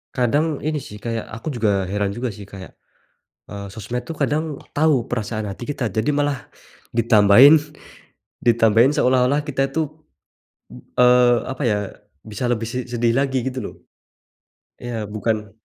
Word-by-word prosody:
Kadang 145 +5 +1
ini 155 +1 -2
sih, 105 - -10
kayak 115 0 -3
aku 110 +7 -8
juga 100 -5 +1
heran 100 +1 -1
juga 120 +5 -3
sih 100 - -10
kayak, 100 -1 -11 0.7
eee, 100 -1 -7
sosmed 120 +4 -5
tuh 145 - -6
kadang 155 -1 -2 0.2
tahu 145 -5 +2
perasaan 110 -2 -3
hati 100 +5 -7
kita. 130 -3 -2
Jadi 110 +8 -1
malah 145 -2 -2 0.4
ditambahin 115 +5 +7 0.9
ditambahin 115 +2 +4
seolah-olah 130 +2 +2
kita 140 -2 -1
itu, 160 -1 -1 1.1
eee, 125 0 +6
apa 130 +2 -5
ya, 105 -4 +2 0.4
bisa 110 +2 -7
lebih 115 -1 -2
se 125 +1 -4
sedih 120 -1 0
lagi 135 -1 +1
gitu 130 0 -6
loh. - - -7 1.1
Ya 120 -3 -4
bukan 105 0 -3
120 Hz, 140 wpm, -21 LUFS, 110-135 Hz, 1.1 s, ditambahin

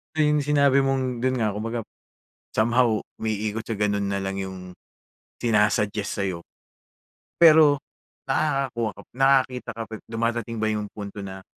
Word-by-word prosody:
Na 155 - +3
yung 150 0 +3
sinabi 140 -1 +3
mong 130 -2 0
doon 130 +2 +1
nga, 105 - +1
kumbaga, 115 +3 -3 0.7
somehow 115 0 +2 0.2
umiikot 110 0 -2
sa 110 -3 -5
gano’n 100 -1 +1
na 100 - -1
lang 95 0 -3
yung 90 -1 -8 0.7
sina-suggest 105 -2 +1
sa’yo. 90 -3 -3 0.9
Pero 155 -4 +6 0.5
nakakakuha 135 -6 0
ka - - -12
pa, - - -30
nakakita 130 -2 +2
ka 115 - -5
pa - - -5
dumadating 115 0 -2
ba 110 - +2
yung 105 -1 -2
punto 100 -1 -7
na, 95 0 -8
115 Hz, 145 wpm, -24 LUFS, 105-135 Hz, 0.9 s, Pero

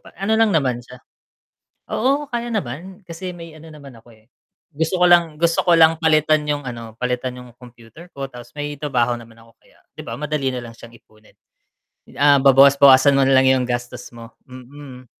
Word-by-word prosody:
ano 195 +3 -2
lang 225 -1 +3
naman 130 -6 0
siya 125 0 -15 0.9
Oo, 275 +5 0
kaya 240 -3 -5
naman 185 - -6
kasi 175 +2 -7
may 165 -2 -12
ano 160 +1 -14
naman 140 -4 -14
ako, 115 - -25
eh, 110 0 -28 0.5
gusto 160 +4 -2
ko 180 - +3
lang, 170 -3 +3
gusto 170 0 +1
ko 175 -1 +3
lang 160 0 +4
palitan 155 -1 +2
yung 145 -1 -2
ano, 115 -2 -9
palitan 125 0 -3
yung 125 0 -13
computer 120 +6 -16
ko, 140 -3 -7
tapos 120 -2 -13
may 145 0 -4
trabaho 125 -5 -1
naman 115 -1 -16
ako 115 0 -21
kaya - - -27 0.2
'di - - -10
ba, - - -8
madali 150 -2 -2
nalang 120 -2 -8
siyang 115 +1 -15
ipunin. 110 -1 -26 0.8
Ah, 145 0 +4
babawas-bawasan 140 0 +5
mo - - +3
nalang 130 0 +3
yung 125 - -2
gastos 120 0 -5
mo, 115 0 -12 0.2
mm. 130 0 -13
140 Hz, 180 wpm, -19 LUFS, 125-160 Hz, 0.9 s, babawas-bawasan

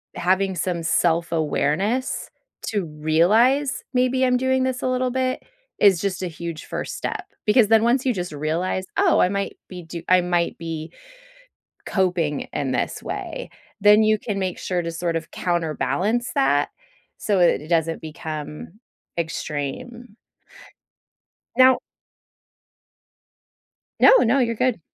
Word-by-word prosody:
having 190 +2 +1
some 175 0 -2
self-awareness 165 - 0 0.4
to 205 -4 -1
realize, 180 - +2
"Maybe 255 +1 +2
I'm 250 -1 +3
doing 260 0 +1
this 260 -1 -2
a - - +1
little 255 0 0
bit," 255 0 -1 0.4
is 195 -4 +6
just 190 -2 -2
a - - -1
huge 170 -1 -7
1st - - -5
step. - - -4 0.2
Because 215 +1 +5
then 225 -1 +5
once 245 +3 +2
you 255 - +2
just 180 -4 -4
realize, 165 +5 -2
"Oh, - - +4
I - - +5
might 200 0 -3
be 180 -2 -8
do 165 +1 -7
I 185 0 +6
might 175 -1 0
be 165 -1 -6 0.9
coping 175 -6 0
in 140 -3 -2
this - - -2
way," - - -6 0.3
then 210 +2 +6
you 215 0 +3
can 205 -3 -4
make 185 -2 -2
sure 180 -2 -2
to 170 - -3
sort 170 0 -2
of 165 -1 -5
counterbalance 180 +7 -1
that 145 - +2 0.5
so 205 -2 0
it 175 -6 +4
it 155 - -11
doesn't 165 -1 0
become 155 +4 -7 0.4
extreme. 185 - -5 1.4
Now 260 0 +6 2.2
No, - - +8
no, 245 +4 +3
you're 235 -2 +1
good. 250 -1 0
185 Hz, 135 wpm, -23 LUFS, 165-240 Hz, 2.2 s, No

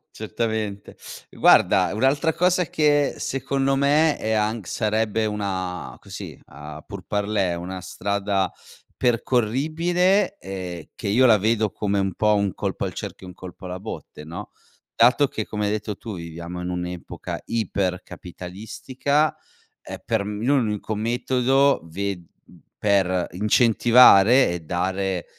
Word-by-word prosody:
Certamente. 110 -2 -3 0.3
Guarda 90 -2 +4
un'altra 140 +8 +2
cosa 180 0 +2
che 145 -1 +2
secondo 135 +1 -1
me 145 +3 +3
è 110 - -3
anch 110 -1 0
sarebbe 110 0 0
una 95 -4 -4
così - - -9
a 75 +1 -10
pour 100 -2 -9
parler, 100 -4 0
una 90 +1 -6
strada, 100 +1 -1 0.5
percorribile 155 - +1
e 90 -3 -7
che 105 - -6
io 125 +6 +4
la 110 -3 +6
vedo 110 0 +1
come 100 -1 -1
un 95 -1 -1
po' 105 -1 +3
un 100 -1 +1
colpo - - -3
al - - -5
cerchio 95 - -7
e - - -8
un 90 - -12
colpo 95 0 -11
alla 90 0 -5
botte, 95 -6 -8
no, 80 +3 -8 0.5
dato 125 +5 +5
che 110 -4 -4
come 105 -1 -3
hai 105 - 0
detto 105 -1 -3
tu 110 -4 -7
viviamo 85 +1 -7
in 90 - -4
un'epoca 90 0 -5
ipercapitalistica, 105 - -2 0.5
eh, - - -8
per 110 -3 -1
l'unico 110 0 -1
metodo 125 +5 +2
ve 100 +5 -3 0.3
mhmm, 90 - -19 0.2
per 95 -3 +2
incentivare 115 +2 +6
e 85 -1 -3
dare 95 +2 -2
105 Hz, 130 wpm, -23 LUFS, 95-125 Hz, 0.5 s, la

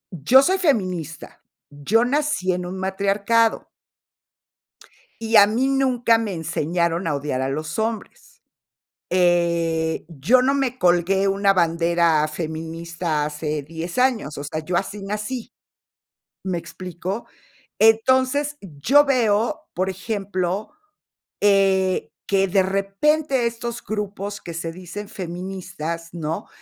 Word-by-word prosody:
yo 250 - +5
soy 380 +4 +2
feminista, 185 - -2 0.3
yo 195 - +1
nací 280 -8 0
en 180 0 -3
un 185 - -6
matriarcado. 200 +4 +1 1.5
Y 225 0 +1
a 200 - +9
mí 240 +6 +1
nunca 250 -4 +3
me 220 -3 -3
enseñaron 170 +2 -1
a 150 - 0
odiar 140 -2 -2
a 130 - -1
los 155 +6 -4
hombres, 220 0 -5 0.7
eh, 170 -3 +1
yo 170 - +3
no 270 +2 +2
me 255 -2 -1
colgué 180 +2 +3
una 195 0 +3
bandera 170 -2 +2
feminista 160 0 -3
hace 150 0 -3
10 165 - -7
años, 225 - +1
o 145 - -5
sea, 155 +2 -4
yo 180 - -2
así 200 +2 -4
nací, 215 +4 -5 0.9
¿me 185 -2 -2
explico?, 185 +4 -6 0.5
entonces, 260 +6 +3
yo 195 - +3
veo, 245 +2 +1
por 185 +2 -1
ejemplo, 195 -1 -3 0.7
eh, 195 -2 +2 0.2
que 195 -1 +2
de 190 +1 +4
repente 235 +8 +1
estos 235 0 -5
grupos 205 -1 -4
que 170 - -8
se 165 0 -4
dicen 185 +3 -8
feministas, 175 -3 -6
¿no?, 160 -1 -4
190 Hz, 120 wpm, -22 LUFS, 170-225 Hz, 1.5 s, a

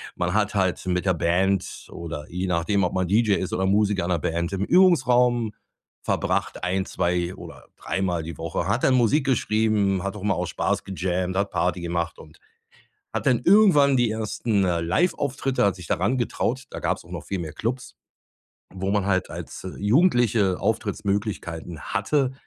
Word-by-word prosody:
Man 90 0 -1
hat 105 0 +1
halt 95 -2 0
mit 90 0 0
der 95 - +3
Band 90 +3 0
oder 80 -3 -6
je 90 +2 -3
nachdem, 90 +3 +1
ob 90 - 0
man 95 -1 0
DJ 105 +2 +3
ist 95 - -3
oder 95 - 0
Musiker 100 -1 +2
in 85 - -3
'ner 85 - +1
Band, 85 +3 -2
im 100 0 -1
Übungsraum 125 - +4 0.5
verbracht, - - -1
1, 95 +1 0
2 90 -1 -1 0.4
oder 95 - -3
Mal 90 -4 -1
die 80 +1 -7
Woche, 85 +2 -3
hat 110 +6 0
dann 130 - +4
Musik 125 +4 +3
geschrieben, 105 -6 +1
hat 100 +1 -3
auch 95 - -9
mal 105 -1 +2
aus 90 -1 -3
Spaß - - -1
gejammt, 95 -1 -2
hat 100 0 0
Party 90 0 0
gemacht 85 0 -3
und 80 0 -15 0.8
hat - - -3
dann 125 -2 +3
irgendwann 170 - +5
die 120 -2 +2
1., 110 -1 -1
äh, 90 -2 +1
Liveauftritte, 135 - 0
hat 100 -2 +1
sich 90 -3 -10
daran 100 +10 +1
getraut. 125 +1 -1
Da - - -7
gab's - - -2
auch - - -16
noch - - -6
viel 100 - -3
mehr 80 -3 -5
Klubs, 125 +3 -4 0.8
wo 95 +1 -2
man 100 -1 +1
halt 95 -2 0
als - - -8
Jugendliche 115 - +3
Auftrittsmöglichkeiten 95 -6 -2
hatte, 130 - 0
100 Hz, 175 wpm, -24 LUFS, 90-115 Hz, 0.8 s, irgendwann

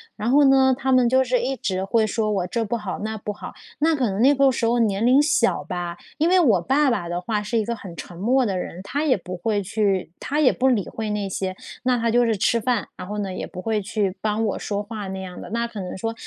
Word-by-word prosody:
然 220 +3 -2
后 285 +2 +5
呢 265 -1 +5
她 265 -1 -1
们 255 -2 +4
就 260 +1 +4
是 250 -1 +1
一 265 +2 -1
直 190 -5 -2
会 220 +3 +2
说 215 0 -1
我 190 -3 0
这 230 +5 -1
不 230 +2 -2
好 210 -3 -5
那 220 +1 -4
不 210 0 -5
好， - - -8 0.3
那 320 +1 +3
可 255 -5 +1
能 195 +4 -2
那 280 +3 +6
个 275 -1 +4
时 230 -1 0
候 240 +1 +2
年 215 -2 +1
龄 255 +3 +5
小 295 -5 +2
吧， 175 -1 -4 0.2
因 325 +3 +3
为 370 0 +5
我 220 - +4
爸 275 +4 +2
爸 175 -7 -2
的 175 - -2
话 210 +3 -2
是 210 +3 -2
一 215 - +1
个 235 - -2
很 185 -6 -10
沉 175 - -8
默 245 +8 +2
的 190 -3 -1
人， 175 - -6
他 285 +9 -2
也 265 -8 +3
不 180 0 -7
会 205 +3 -1
去 195 -3 0
他 295 +3 -2
也 285 - +5
不 265 - +1
理 225 -7 +2
会 220 -1 -4
那 205 -1 -2
些 190 0 -3 0.3
那 250 -1 +2
他 230 -1 0
就 245 +1 +4
是 220 -3 +1
吃 230 +4 +2
饭， 250 0 0
然 180 - -8
后 210 +1 -5
呢， 195 -2 -3
也 - - -5
不 185 - -9
会 215 +1 -1
去 195 -1 -1
帮 220 +1 0
我 205 - -2
说 205 0 -3
话 210 -2 -6
那 190 0 -5
样 180 -1 -8
的。 - - -9
那 235 +1 -1
可 220 -3 -8
能 180 - -6
说 225 +4 -3
220 Hz, 295 characters per minute, -23 LUFS, 195-250 Hz, 0.3 s, 那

